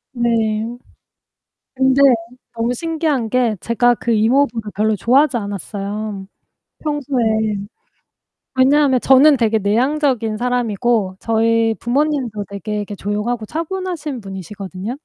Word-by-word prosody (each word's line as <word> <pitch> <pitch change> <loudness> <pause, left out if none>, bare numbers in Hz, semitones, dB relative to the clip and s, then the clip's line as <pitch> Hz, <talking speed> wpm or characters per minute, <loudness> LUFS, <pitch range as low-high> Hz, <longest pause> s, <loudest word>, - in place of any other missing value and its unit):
네. 225 -2 +1 1.1
근데 265 +1 +3 0.5
너무 230 +2 -1
신기한 310 -6 -1
게 245 -4 +1
제가 240 +1 +2
그 235 - -4
이모부를 225 0 +1
별로 215 +2 +1
좋아하지 270 +5 +3
않았어요, 200 0 -5 0.5
평소에. 285 -5 -1 1.3
왜냐하면 265 0 +4
저는 275 +4 +6
되게 225 -3 +2
내향적인 240 +1 +1
사람이고 235 -4 0
저희 225 0 +2
부모님도 250 -5 -1
되게 200 +1 -5
이렇게 205 0 -5
조용하고 210 +3 -3
차분하신 330 - -4
분이시거든요. 195 - -7
235 Hz, 280 characters per minute, -18 LUFS, 215-265 Hz, 1.3 s, 저는